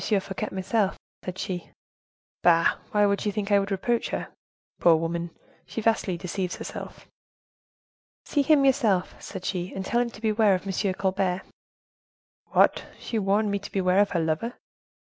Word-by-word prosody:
Fouquet 195 -2 -1
myself,' 190 +1 0 0.3
said 185 0 -5
she." 180 -3 -4 0.7
"Bah! 165 -1 +4
why 210 0 +3
should 200 0 +1
she 210 - 0
think 205 0 -3
I 200 - +6
would 195 0 -2
reproach 225 +4 0
her? - - -3 0.5
Poor 170 -1 +6
woman, 170 +1 -2 0.4
she - - -5
vastly 215 -5 +1
deceives 180 +1 -3
herself." - - -8 1.2
"'See 290 - +1
him 280 -1 +4
yourself,' 230 -9 +2
said 190 -2 -7
she, 180 -1 -2
'and 190 - -5
tell 240 +4 +2
him 240 - -1
to 230 - -13
beware 215 -2 +3
of 185 - -5
M. 195 0 0
Colbert.'" 190 -1 0 1.0
"What! - - +3
she 225 - -3
warned 205 +1 +2
me 200 - 0
to 200 - -9
beware 185 0 +2
of 205 -1 +4
her 175 - 0
lover?" 165 +9 -1
195 Hz, 160 wpm, -26 LUFS, 185-215 Hz, 1.2 s, I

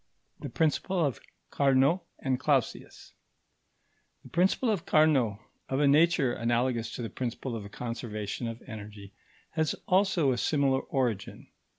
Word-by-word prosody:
§ - - -25
3. - - -4
THE - - -12
PRINCIPLE 165 +2 +1
OF 135 - -2 0.3
CARNOT 140 +5 +3 0.2
AND 130 -2 -1
CLAUSIUS 135 -3 -1 1.1
The - - -13
principle 190 +7 +2
of 195 -6 -3
Carnot, 140 -9 +3 0.3
of 135 - 0
a 145 - +4
nature 150 -3 +4
analogous 120 0 0
to 120 - -5
the 115 - -4
principle 125 0 -4
of 110 - -4
the 100 - -9
conservation 115 -1 -5
of 115 +1 -7
energy, 105 -3 -10 0.4
has 160 -2 0
also 185 -6 +3
a 120 - -1
similar 140 -3 +2
origin. 120 -7 -3
130 Hz, 150 wpm, -29 LUFS, 115-155 Hz, 1.1 s, a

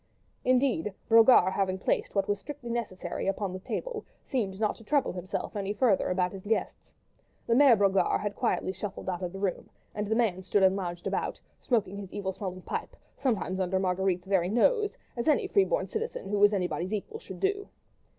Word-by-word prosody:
Indeed, 250 -7 +2
Brogard 225 -5 +6
having 190 -1 0
placed 190 - -1
what 195 0 +1
was 205 -1 0
strictly 265 -1 -7
necessary 225 -7 -3
upon 195 -1 -1
the 185 - -5
table, 460 - -4 0.2
seemed 205 -7 -2
not 215 -1 +1
to - - -14
trouble 285 +4 +1
himself 180 +3 -5
any 200 0 -2
further 210 -3 +2
about 180 0 +1
his 195 0 -9
guests. 225 - -2 0.5
The 230 - +2
Mere 265 -1 +7
Brogard 195 -1 +3
had 205 -1 -3
quietly 225 -6 0
shuffled 195 +1 -6
out 180 -1 -3
of 180 -1 -3
the 195 - -8
room, 195 -2 -2 0.2
and 210 0 -3
the 220 - +1
man 215 -6 +1
stood 195 +1 +1
and 190 0 +5
lounged 175 -3 -4
about, - - -2 0.2
smoking 205 -5 0
his 195 -2 -8
evil 195 -2 -3
smelling 185 -2 -6
pipe, - - -4 0.2
sometimes 205 -8 -1
under 190 0 +1
Marguerite's 185 -1 0
very 190 -2 +1
nose, 415 - +2 0.2
as 235 +3 -3
any 305 - +3
free 395 -2 +3
born - - 0
citizen 445 - -4
who 205 0 0
was 205 +1 +6
anybody's 185 -1 -1
equal 330 - -4
should - - -10
do. 405 +1 -1
200 Hz, 195 wpm, -29 LUFS, 190-235 Hz, 0.5 s, Mere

